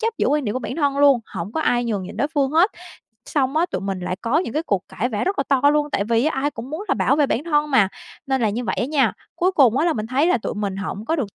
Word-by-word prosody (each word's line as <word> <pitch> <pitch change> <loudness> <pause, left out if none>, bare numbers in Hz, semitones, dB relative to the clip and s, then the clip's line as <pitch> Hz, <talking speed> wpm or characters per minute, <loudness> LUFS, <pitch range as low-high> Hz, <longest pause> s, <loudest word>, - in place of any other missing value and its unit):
chấp 450 0 -1
giữ - - +2
quan 295 -1 +1
điểm 210 - -1
của - - 0
bản 255 - -5
thân 280 -3 0
luôn, 280 -4 +5
hổng 175 +5 -5
có 320 - -1
ai 245 -5 +1
nhường 210 -5 -2
nhịn 185 - -8
đối 280 +6 0
phương 285 -4 0
hết, 335 +7 +4 0.6
xong 275 0 0
á 335 - +3
tụi 335 - -4
mình 195 -1 -3
lại 180 0 -3
có 240 +7 +2
những 330 -10 -3
cái 310 - 0
cuộc 200 - -1
cãi 245 - -2
vã 210 -3 -1
rất 385 +2 -1
là 275 - +3
to 275 -2 +2
luôn, 295 0 0
tại 200 - 0
vì 230 +3 +1
á 310 -4 0
ai 290 +2 0
cũng 250 0 -8
muốn 340 +7 -5
là - - +2
bảo 280 - +2
vệ 295 -2 +3
bản 270 +2 -1
thân 300 -2 +1
mà, 220 -8 +4 0.4
nên 265 -2 0
là 215 - +2
như 235 +4 -3
vậy - - -2
á - - +1
nha, 290 -1 +2 0.2
cuối 365 +2 +1
cùng 260 - +4
á, 320 - +2
là 335 - +3
mình 215 -3 -3
thấy 265 +6 +1
là 350 - +3
tụi - - -4
mình 200 -2 -3
hổng 200 +1 -5
có 320 +8 0
được 225 -10 -4
270 Hz, 325 wpm, -21 LUFS, 220-300 Hz, 0.6 s, luôn